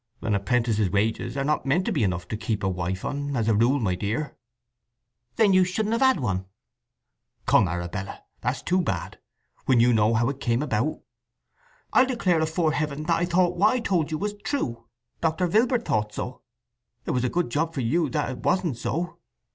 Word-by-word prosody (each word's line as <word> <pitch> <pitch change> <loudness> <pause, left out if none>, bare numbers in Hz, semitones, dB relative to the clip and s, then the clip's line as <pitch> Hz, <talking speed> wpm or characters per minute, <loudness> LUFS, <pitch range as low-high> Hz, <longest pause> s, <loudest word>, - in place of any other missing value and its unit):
"An 110 -2 0
apprentice's 110 0 +1
wages 105 +7 -1
are 135 - 0
not 150 +2 0
meant 170 +7 +2
to - - 0
be 155 - 0
enough 90 -2 -1
to - - -2
keep 110 -1 -3
a - - +2
wife 95 0 -3
on, 145 0 -3
as 115 -3 0
a 110 - +4
rule, 120 +7 +3
my 100 -7 0
dear." 110 +11 -3 1.0
"Then 210 -4 +4
you 185 0 +6
shouldn't 210 +5 -1
have 230 - 0
had 260 -8 +4
one." 95 -7 -2 1.0
"Come, 95 - +4
Arabella! 90 +3 -5 0.2
That's 125 +2 -2
too 185 +2 +2
bad, 170 - -3 0.5
when 130 -3 +4
you 120 +1 +5
know 110 +1 +3
how 115 +1 +2
it 140 -1 -5
came 120 +2 0
about." 145 +2 -1 0.9
"I'll 255 - +5
declare 190 -10 +1
afore 160 0 +1
Heaven 150 -1 -2
that 165 +1 +1
I - - +3
thought 175 0 +2
what 200 +7 +4
I - - +1
told 180 -9 0
you 155 - -2
was 205 +4 -2
true. 125 - -2 0.4
Doctor 165 +2 +1
Vilbert 230 +6 +2
thought 105 -1 -1
so. 125 - -5 0.6
It - - -1
was 125 -1 0
a 125 - +1
good 175 -5 -1
job 160 +4 -1
for 135 - -1
you 155 +9 +1
that 150 -4 -1
it 130 - -6
wasn't 180 -9 0
so!" 170 +8 -3
140 Hz, 200 wpm, -25 LUFS, 110-175 Hz, 1.0 s, you